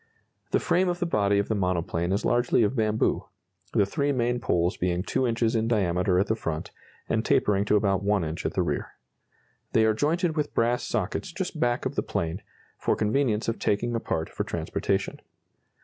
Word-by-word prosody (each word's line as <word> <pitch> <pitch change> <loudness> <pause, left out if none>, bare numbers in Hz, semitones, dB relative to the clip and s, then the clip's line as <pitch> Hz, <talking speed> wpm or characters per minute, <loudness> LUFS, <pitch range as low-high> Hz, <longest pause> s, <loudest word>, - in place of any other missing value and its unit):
The - - +2
frame 180 +2 +2
of 175 - -1
the 175 - -1
body 100 -10 +2
of 100 - +1
the - - 0
monoplane 90 -3 -1
is 100 - 0
largely 120 -1 +3
of 105 +5 +1
bamboo, 110 -2 +1 0.5
the 100 - +4
three 140 +7 0
main 120 -2 0
poles 90 -5 +1
being 90 0 -1
2 130 +5 0
inches 115 0 +1
in 110 0 +1
diameter 90 -4 +2
at 95 - +3
the 110 - +1
front, 80 -8 -4 0.4
and - - 0
tapering 100 -1 +2
to 105 - +3
about 100 -2 +2
1 100 -2 +1
inch 80 +1 -4
at - - -2
the - - +2
rear. - - -3 0.8
They 110 - +4
are 110 - +4
jointed 160 - 0
with 150 -2 -2
brass 120 +1 +2
sockets 115 - -2
just 175 -2 -4
back 120 -2 +1
of - - -1
the - - 0
plane, 85 +4 -3 0.4
for - - +1
convenience 110 0 +1
of 115 - -1
taking 120 +4 0
apart 80 -8 -2
for - - -4
transportation. - - -2
110 Hz, 195 wpm, -26 LUFS, 95-120 Hz, 0.8 s, the